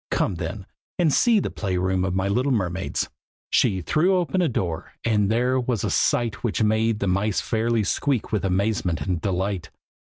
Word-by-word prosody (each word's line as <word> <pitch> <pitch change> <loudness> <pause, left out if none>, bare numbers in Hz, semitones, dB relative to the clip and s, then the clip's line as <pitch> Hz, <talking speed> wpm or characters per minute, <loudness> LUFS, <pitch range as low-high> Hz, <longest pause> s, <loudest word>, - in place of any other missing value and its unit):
Come - - 0
then, - - -5 0.3
and 165 -6 +2
see 230 -3 +4
the - - -3
play 95 -4 -2
room 90 0 0
of 95 -1 -1
my 95 +1 0
little 125 +7 +1
mermaids!" 95 -5 -1 0.4
She 95 -2 +2
threw 170 - +2
open 180 +1 +1
a 170 - +2
door, 85 -8 -3
and 105 -3 +2
there 125 +3 +2
was 120 -4 -1
a - - -1
sight 115 -3 +1
which 115 -1 0
made 110 +1 +2
the 100 - -2
mice 100 +2 +1
fairly 115 -1 0
squeak 130 +4 -1
with 105 - 0
amazement 95 -3 0
and 90 -4 -2
delight. 95 -2 -2
105 Hz, 185 wpm, -24 LUFS, 95-120 Hz, 0.4 s, see